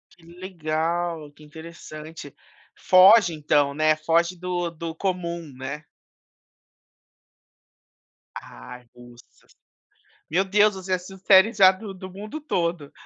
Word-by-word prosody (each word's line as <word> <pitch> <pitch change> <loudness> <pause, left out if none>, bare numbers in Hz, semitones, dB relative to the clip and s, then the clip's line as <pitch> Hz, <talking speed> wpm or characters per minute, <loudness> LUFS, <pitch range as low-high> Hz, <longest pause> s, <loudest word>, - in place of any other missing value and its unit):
Que 175 - -25
legal, 170 -2 -4
que 150 +1 -19
interessante. 155 -1 -11 0.4
Foge 185 0 +5
então 145 -2 +1
né, 155 +1 +2
foge 165 +3 0
do 175 -1 -3
do 165 0 -7
comum, 170 -4 -4
né? 140 +3 -7 2.6
Ai, 120 - -13
russas, 120 0 -19 0.8
meu 185 +5 +1
Deus, 205 +1 +3
você 190 0 -4
assistiu 185 +1 -5
séries 195 +3 +4
já 190 -2 +7
do 195 +1 -9
do 185 0 -10
mundo 210 +10 -8
todo. 170 - -3
170 Hz, 110 wpm, -23 LUFS, 155-185 Hz, 2.6 s, já